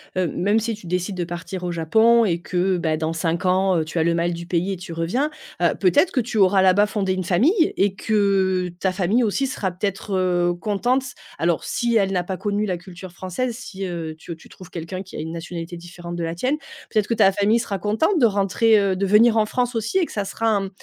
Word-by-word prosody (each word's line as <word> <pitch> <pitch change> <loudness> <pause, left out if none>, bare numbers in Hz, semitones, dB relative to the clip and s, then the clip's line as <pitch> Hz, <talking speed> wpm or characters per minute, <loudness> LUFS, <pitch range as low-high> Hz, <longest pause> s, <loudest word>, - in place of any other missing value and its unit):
heu, 185 -1 +1
même 205 +6 +1
si 225 0 -2
tu 205 - -15
décides 180 +2 -2
de 175 - -1
partir 175 +2 -6
au 175 - -2
Japon 220 +8 +4
et 175 -6 +1
que, 180 +2 0
bah, 160 -2 0
dans 160 +1 -2
5 165 +2 -1
ans, 185 0 +3
heu, - - 0
tu 160 - -6
as 160 - +3
le 170 +1 +2
mal 170 +1 0
du 170 0 -6
pays 175 +2 -1
et - - -5
tu 175 -1 -8
reviens, 195 - -1 0.3
heu, 170 - +3
peut-être 190 - +3
que 265 - 0
tu 230 0 -4
auras 195 -1 +5
là-bas 190 +2 +5
fondé 200 -3 -1
une 185 0 -2
famille 280 - +2
et 195 -1 +2
que 195 -3 +1
ta 190 - +1
famille 195 +6 +1
aussi 235 +5 0
sera 200 -7 -2
peut-être, 195 +2 -4
heu, 175 -1 +1
contente- 215 +8 0 0.4
alors, 170 -1 +1
si 235 -1 -1
elle 195 -3 +3
n'a 180 -2 0
pas 185 +1 -4
connu 205 +1 -1
la 180 -2 -1
culture 180 +1 -11
française, 195 +7 -3
si, 195 -6 -6
heu, 170 -3 -4
tu, 170 - -10
heu, - - -4
tu 160 - -18
trouves 185 -1 -13
quelqu'un 170 +2 -6
qui 190 - -12
a - - -5
une 160 +1 -5
nationalité 170 +1 -6
différente 175 0 -8
de 170 - -3
la 165 0 -3
tienne- 260 - 0 0.3
peut-être 215 -3 +1
que 230 - 0
ta 200 -3 +5
famille 205 +4 +2
sera 205 -4 -3
contente 225 - +1
de 250 - +5
rentrer, 205 +2 +3
heu, 195 -2 +1
de 195 +2 -1
venir 220 +3 +5
en 215 -1 +3
France 245 +2 -1
aussi 225 - -1
et 370 - +3
que - - -12
ça 205 -2 -2
sera 225 +3 -2
un, 210 -3 +2
mmh, - - -6
190 Hz, 250 wpm, -22 LUFS, 175-215 Hz, 0.4 s, auras